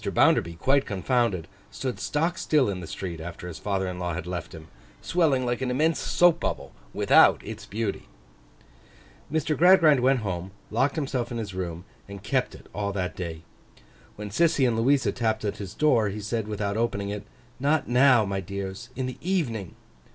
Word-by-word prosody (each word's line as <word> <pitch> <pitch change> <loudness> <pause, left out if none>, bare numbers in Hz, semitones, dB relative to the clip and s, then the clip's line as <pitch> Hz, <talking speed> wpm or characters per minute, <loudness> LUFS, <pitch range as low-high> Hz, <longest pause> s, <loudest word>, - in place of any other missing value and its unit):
Bounderby 85 0 +2
quite 135 +11 +2
confounded, 100 -3 0 0.2
stood 130 -2 -4
stock 165 +4 -1
still 150 -4 +2
in 95 -2 -3
the 85 - -7
street 85 -3 -6
after 85 +1 -7
his 85 - -7
father 95 -2 -1
in 90 -1 -5
law 90 -2 -2
had 85 - -5
left 90 -2 -5
him, 80 -1 -11 0.3
swelling 150 -7 +1
like 120 +1 -1
an 130 - -1
immense 155 +6 +1
soap 175 -2 +3
bubble, - - -3 0.2
without - - +5
its - - -8
beauty. 110 -1 -3 1.2
Mr. 155 0 0
Gradgrind 165 -3 +6
went 130 0 +3
home, 95 -2 -4 0.2
locked 135 +6 +1
himself 130 -6 -2
in 120 - -3
his 105 -4 -5
room, 90 -1 -5 0.2
and 100 -1 -9
kept - - 0
it - - -15
all 100 0 -2
that 90 -2 -3
day. 80 -3 -6 0.7
When 105 -1 -7
Sissy 145 - +3
and 120 - +1
Louisa 130 +5 +2
tapped 110 -3 -1
at 100 - -2
his 100 -2 -7
door, 120 -9 +3
he 105 +2 -5
said, 110 +1 -3
without 105 -1 -2
opening 100 -3 -1
it, 105 0 -4 0.4
'Not 145 +4 +1
now, 125 -2 +5
my 100 0 -2
dears; 100 +4 -6
in 130 - -2
the 130 -1 -6
evening. 130 - -2
110 Hz, 180 wpm, -26 LUFS, 95-135 Hz, 1.2 s, Gradgrind